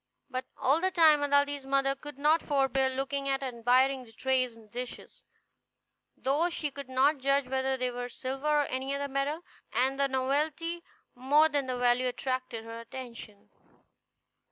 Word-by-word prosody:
But 255 0 -3
all 285 +5 +2
the 375 - +2
time 320 -5 +5
Aladdin's 285 0 +2
mother 275 0 +2
could 295 0 -10
not 305 +3 +3
forbear 270 -2 +1
looking 275 +1 -2
at 270 0 0
and 250 -3 -4
admiring 255 +3 +3
the 230 - -16
tray 260 +3 +1
and 225 -3 -15
dishes, 245 +1 -7 1.0
though 290 +7 +1
she 305 -4 -3
could 275 -1 -8
not 270 +3 +3
judge 275 0 +2
whether 265 0 0
they 255 -1 -1
were 245 0 -5
silver 265 +4 -5
or 295 -1 +3
any 265 +1 -3
other 280 0 -2
metal, 280 +4 -2 0.3
and 265 +2 +1
the 280 - +3
novelty 300 +6 -1 0.3
more 290 +5 +4
than 285 -3 -1
the 255 -1 -2
value 245 +1 +2
attracted 255 -2 -3
her 230 0 -7
attention. 230 -3 -9
270 Hz, 165 wpm, -29 LUFS, 255-285 Hz, 1.0 s, time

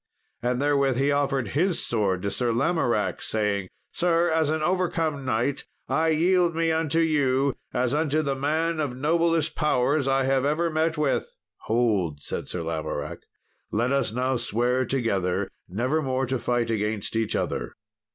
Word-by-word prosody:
And 125 +1 0
therewith 140 -2 +2
he 140 +2 +2
offered 135 -5 0
his 175 +5 +1
sword 100 -5 0
to 100 - -1
Sir 120 -2 0
Lamoracke, 120 -3 0
saying, 100 -3 -1 0.2
"Sir, 170 -1 +2
as 160 -2 +2
an 155 0 0
overcome 165 -5 0
knight, 130 +3 -1 0.2
I 160 +1 +1
yield 170 +2 +3
me 165 0 +1
unto 160 0 +1
you 140 -4 +2 0.2
as 125 +1 0
unto 155 0 +1
the 140 -2 0
man 155 +4 0
of 140 -5 -2
noblest 165 +2 +1
powers 140 -1 +1
I 135 0 +2
have 135 0 +2
ever 160 +4 +1
met 160 +1 0
with." 150 -2 0 0.3
"Hold," 105 -10 +1
said - - -5
Sir 90 - -3
Lamoracke, 80 -1 -4 0.4
"let 120 +4 +1
us 135 -5 +1
now 130 +2 0
swear 120 +2 0
together 100 -9 0 0.2
nevermore 130 - 0
to 130 0 -2
fight 120 -1 0
against 105 -1 -2
each 115 -1 0
other." - - -2
135 Hz, 155 wpm, -25 LUFS, 120-155 Hz, 0.4 s, yield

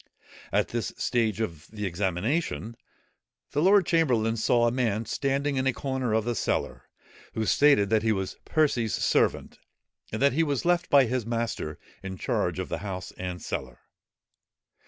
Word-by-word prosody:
At - - +1
this 120 -1 -2
stage 115 -4 0
of 85 -8 -4
the 105 -1 -5
examination, 105 - -1 0.8
the 145 - 0
lord 195 +2 +5
chamberlain 125 -10 +2
saw 120 +1 +2
a 120 - +3
man 115 -3 0
standing 140 +4 -1
in 130 0 +1
a 135 - +2
corner 130 -3 -2
of 110 0 +1
the 120 - 0
cellar, - - -2 0.5
who 110 - -1
stated 140 -6 +4
that 110 -1 +4
he 110 0 +1
was 95 -3 -2
Percy's 130 -8 +1
servant, - - +1 0.5
and 110 - -3
that 140 0 +4
he 160 - +2
was 145 -3 0
left 175 0 +2
by 140 -2 +6
his 120 -1 -2
master 115 -10 -3 0.2
in 95 -1 -6
charge - - -1
of - - -3
the - - -3
house 95 -2 -5
and 90 -1 -5
cellar. 65 -2 -5
115 Hz, 165 wpm, -27 LUFS, 105-140 Hz, 0.8 s, by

